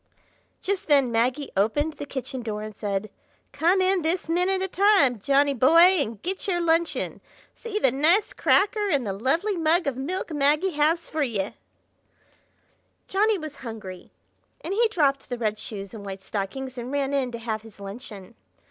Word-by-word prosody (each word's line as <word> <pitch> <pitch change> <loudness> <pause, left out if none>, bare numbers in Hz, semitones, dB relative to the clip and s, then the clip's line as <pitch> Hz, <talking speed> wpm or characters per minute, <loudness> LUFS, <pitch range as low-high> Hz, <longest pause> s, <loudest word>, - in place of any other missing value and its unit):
Just 395 -1 -2
then 280 -5 +4
Maggie 250 +5 0
opened 290 +11 +1
the 290 - -8
kitchen 265 -1 -5
door 215 -2 -4
and 215 -1 -8
said: 205 0 -3 0.4
"Come 340 +6 +2
in 375 0 +2
this 330 +2 -1
minute 365 +3 +1
of 380 - -4
time, 380 - +4
Johnny 280 +5 +3
boy, 265 +6 +4 0.2
and 225 -5 -4
get 375 +3 -3
your 355 -3 +1
luncheon! 335 0 0 0.3
see 455 -3 -5
the 265 -12 +3
nice 325 - +2
cracker 415 +1 +2
and 280 -7 +1
the 195 - -2
lovely 300 - 0
mug 335 +1 +2
of 280 -3 -1
milk 330 +6 -3
Maggie 300 +5 +2
has 315 +2 +1
for 310 - -3
ye!" 215 -8 -1 1.6
Johnny 420 +2 +2
was 310 -4 -8
hungry, 215 -7 -8 0.5
and 360 - -4
he 460 +3 +3
dropped 285 -11 0
the 245 - -3
red 215 -2 -1
shoes 200 -2 -7
and 215 -3 -8
white 195 -1 -7
stockings 250 +7 -4
and 240 +2 -6
ran 280 -1 -1
in 265 -3 0
to 235 - -5
have 225 -2 -4
his 220 -2 -16
luncheon. 200 0 -9
280 Hz, 175 wpm, -25 LUFS, 225-345 Hz, 1.6 s, then